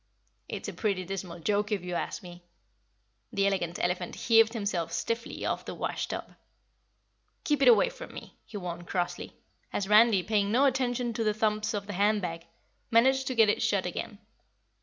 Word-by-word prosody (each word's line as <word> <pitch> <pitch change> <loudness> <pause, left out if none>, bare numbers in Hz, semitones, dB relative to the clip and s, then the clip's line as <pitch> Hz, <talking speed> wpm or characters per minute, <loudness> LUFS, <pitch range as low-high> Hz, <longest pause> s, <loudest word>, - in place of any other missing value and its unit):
"It's - - -5
a - - -5
pretty 195 -4 -1
dismal 180 -2 -6
joke, 205 +4 0
if 200 -4 -1
you 180 0 -5
ask 175 - -3
me." 175 -1 -11 0.9
The 200 0 +1
Elegant 175 -3 0
Elephant 180 0 -2
heaved 225 -1 +4
himself 200 -7 -2
stiffly 230 0 -3
off - - -1
the - - -6
wash - - -3
tub. - - -6 1.1
"Keep 295 -2 +1
it 270 - +5
away 245 - +6
from - - -10
me!" - - -10
he 210 - -8
warned 175 -2 -6
crossly, 175 -1 -3 0.4
as 195 - -2
Randy, 210 -2 +6
paying 205 -1 +1
no 260 +5 +4
attention 250 -2 0
to 230 0 -1
the 215 -1 +1
thumps 215 0 0
of 200 -1 -3
the 205 - -6
hand 205 +3 +2
bag, 165 -3 -5 0.4
managed 265 +3 +4
to 255 - -2
get 225 -2 +6
it 205 - +1
shut 195 -3 +1
again. 190 +4 -5
205 Hz, 180 wpm, -29 LUFS, 180-230 Hz, 1.1 s, away